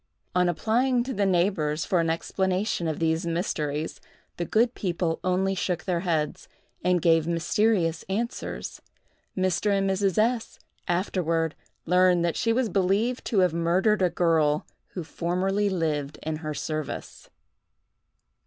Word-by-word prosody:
On 180 Hz, 0 st, +3 dB
applying 240 Hz, +7 st, +1 dB
to 260 Hz, +2 st, -4 dB
the 200 Hz, 0 st, +1 dB
neighbors 170 Hz, -4 st, +1 dB
for 180 Hz, -, +1 dB
an 165 Hz, -1 st, +1 dB
explanation 185 Hz, +2 st, -1 dB
of 155 Hz, -, -2 dB
these 160 Hz, +1 st, +1 dB
mysteries, 155 Hz, -3 st, -2 dB, 0.4 s
the 175 Hz, -, -2 dB
good 235 Hz, +7 st, +2 dB
people 170 Hz, -3 st, -1 dB
only 185 Hz, +1 st, +1 dB
shook 180 Hz, -2 st, -2 dB
their 180 Hz, -3 st, 0 dB
heads, 160 Hz, -4 st, -1 dB, 0.4 s
and 180 Hz, -1 st, +2 dB
gave 165 Hz, -1 st, +4 dB
mysterious 170 Hz, 0 st, +1 dB
answers. 230 Hz, +5 st, -4 dB, 0.6 s
Mr. 185 Hz, +2 st, +1 dB
and 195 Hz, 0 st, +1 dB
Mrs. 195 Hz, 0 st, +1 dB
S—— 225 Hz, +1 st, +1 dB, 0.3 s
afterward 170 Hz, -3 st, 0 dB, 0.3 s
learned 180 Hz, 0 st, +4 dB
that 170 Hz, -, 0 dB
she 230 Hz, -, +1 dB
was 245 Hz, +1 st, +2 dB
believed 205 Hz, +6 st, +1 dB
to 205 Hz, -5 st, +2 dB
have 180 Hz, -3 st, +3 dB
murdered 180 Hz, +5 st, +2 dB
a 180 Hz, -, +4 dB
girl 160 Hz, -3 st, +2 dB, 0.3 s
who 180 Hz, -, -4 dB
formerly 190 Hz, +5 st, 0 dB
lived 155 Hz, -6 st, -1 dB
in 155 Hz, 0 st, -2 dB
her 155 Hz, -1 st, -5 dB
service. 155 Hz, 0 st, -5 dB
180 Hz, 140 wpm, -26 LUFS, 165-195 Hz, 0.6 s, gave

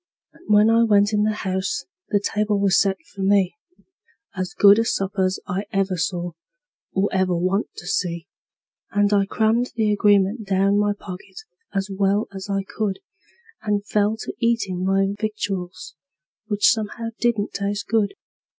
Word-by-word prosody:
And -, -, -21 dB
when 210 Hz, +2 st, +6 dB
I 230 Hz, +1 st, +5 dB
went 205 Hz, -1 st, +3 dB
in 210 Hz, 0 st, +2 dB
the 215 Hz, -, +1 dB
house 190 Hz, +9 st, -2 dB, 0.2 s
the 205 Hz, -, +2 dB
table 210 Hz, 0 st, 0 dB
was 195 Hz, -1 st, +4 dB
set 195 Hz, -1 st, +1 dB, 0.2 s
for 195 Hz, -, -7 dB
me 195 Hz, -1 st, +3 dB, 0.8 s
As 185 Hz, -1 st, -4 dB
good 205 Hz, +1 st, +7 dB
a -, -, +3 dB
supper's 190 Hz, -3 st, -1 dB
I 195 Hz, +3 st, -3 dB
ever 195 Hz, -1 st, 0 dB
saw, 175 Hz, 0 st, -2 dB, 0.6 s
or 195 Hz, +1 st, +1 dB
ever 185 Hz, -2 st, +1 dB
want 185 Hz, +4 st, 0 dB
to -, -, -10 dB
see; 170 Hz, -2 st, -2 dB, 0.6 s
And 205 Hz, 0 st, +2 dB
I 200 Hz, -1 st, +3 dB
crammed 225 Hz, +3 st, +1 dB
the 215 Hz, -2 st, +2 dB
agreement 205 Hz, +1 st, +2 dB
down 195 Hz, +1 st, +2 dB
my 205 Hz, 0 st, +2 dB
pocket 185 Hz, -, -9 dB, 0.3 s
as 195 Hz, 0 st, -1 dB
well 200 Hz, +2 st, +1 dB
as 195 Hz, 0 st, -7 dB
I 195 Hz, 0 st, 0 dB
could, 200 Hz, 0 st, -3 dB, 0.6 s
And 205 Hz, -1 st, -1 dB
fell 210 Hz, +1 st, +1 dB
to -, -, -5 dB
eatin' 220 Hz, -6 st, 0 dB
my 195 Hz, +1 st, +2 dB
victuals, 200 Hz, -4 st, -4 dB, 0.5 s
which 205 Hz, -1 st, +4 dB
somehow 225 Hz, 0 st, -3 dB
didn't 225 Hz, -4 st, 0 dB
taste 200 Hz, +1 st, -2 dB
good. 220 Hz, -, +1 dB
200 Hz, 160 wpm, -22 LUFS, 190-210 Hz, 0.8 s, good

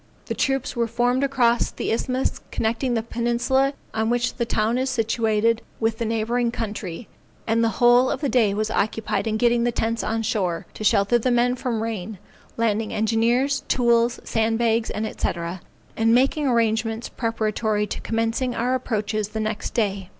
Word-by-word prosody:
The -, -, -3 dB
troops 270 Hz, -2 st, -1 dB
were 235 Hz, -1 st, +1 dB
formed 245 Hz, +3 st, +1 dB
across 245 Hz, -4 st, +2 dB
the -, -, -3 dB
isthmus 255 Hz, +3 st, -1 dB
connecting 235 Hz, +3 st, -1 dB
the 225 Hz, -, 0 dB
peninsula 240 Hz, +4 st, +1 dB, 0.2 s
on 220 Hz, 0 st, 0 dB
which 240 Hz, +1 st, +1 dB
the 235 Hz, -2 st, -2 dB
town 225 Hz, +3 st, +1 dB
is 260 Hz, +1 st, 0 dB
situated 225 Hz, -2 st, +1 dB, 0.2 s
with 225 Hz, 0 st, 0 dB
the 230 Hz, -, -1 dB
neighboring 230 Hz, +2 st, 0 dB
country, 210 Hz, -4 st, -5 dB, 0.4 s
and 230 Hz, +1 st, +2 dB
the 230 Hz, -, +3 dB
whole 245 Hz, +1 st, +5 dB
of -, -, -2 dB
the 290 Hz, -, -1 dB
day 225 Hz, -6 st, +2 dB
was 215 Hz, +1 st, -1 dB
occupied 220 Hz, +1 st, -1 dB
in 220 Hz, 0 st, 0 dB
getting 235 Hz, +1 st, +3 dB
the 240 Hz, -, +1 dB
tents 230 Hz, 0 st, -1 dB
on 225 Hz, +1 st, -1 dB
shore, 185 Hz, -7 st, -1 dB
to -, -, -7 dB
shelter 205 Hz, +3 st, +3 dB
the 255 Hz, -, 0 dB
men 245 Hz, 0 st, +3 dB
from 240 Hz, -4 st, -2 dB
rain, 220 Hz, -2 st, -4 dB, 0.4 s
landing 225 Hz, -1 st, 0 dB
engineers, 235 Hz, +5 st, +1 dB
tools, 235 Hz, -1 st, +2 dB
sand 225 Hz, 0 st, 0 dB
bags, 230 Hz, -1 st, +1 dB
&c., -, -, -5 dB, 1.0 s
and 225 Hz, +1 st, +3 dB
making 275 Hz, +3 st, +2 dB
arrangements 225 Hz, -1 st, +1 dB
preparatory 220 Hz, -2 st, -1 dB
to -, -, -5 dB
commencing 230 Hz, +2 st, -1 dB
our 245 Hz, +2 st, 0 dB
approaches 215 Hz, -4 st, -1 dB
the 220 Hz, +1 st, -5 dB
next 215 Hz, 0 st, -3 dB
day. 200 Hz, -5 st, -1 dB
230 Hz, 170 wpm, -23 LUFS, 220-240 Hz, 1.0 s, whole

